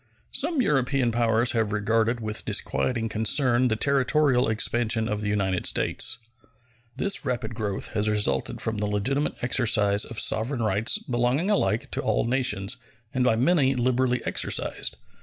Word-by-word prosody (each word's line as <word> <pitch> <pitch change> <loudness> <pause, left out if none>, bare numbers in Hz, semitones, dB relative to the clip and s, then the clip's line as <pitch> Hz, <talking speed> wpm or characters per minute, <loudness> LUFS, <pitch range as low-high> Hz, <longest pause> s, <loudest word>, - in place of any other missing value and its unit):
Some 305 -7 +2
European 135 - +1
powers 115 0 +2
have 110 -3 -1
regarded 115 +3 0
with 110 -1 -4
disquieting 115 -3 -1
concern 120 +3 +2
the 110 - 0
territorial 135 0 +2
expansion 110 0 0
of 105 -2 -3
the 105 - -2
United 95 -3 0
States. - - +1 0.8
This 200 - 0
rapid 125 -4 -3
growth 105 -3 -3
has 105 0 0
resulted 105 -1 0
from 110 -2 -3
the 105 - -1
legitimate 130 +9 -1
exercise 105 -5 +2
of 115 - -5
sovereign 120 +2 0
rights 105 +1 +1
belonging 125 +10 -1
alike 115 - 0
to - - -2
all - - 0
nations, 125 -4 +1 0.4
and 130 - 0
by 125 -3 +3
many 135 +1 +2
liberally 125 0 0
exercised. - - 0
120 Hz, 145 wpm, -25 LUFS, 110-130 Hz, 0.8 s, by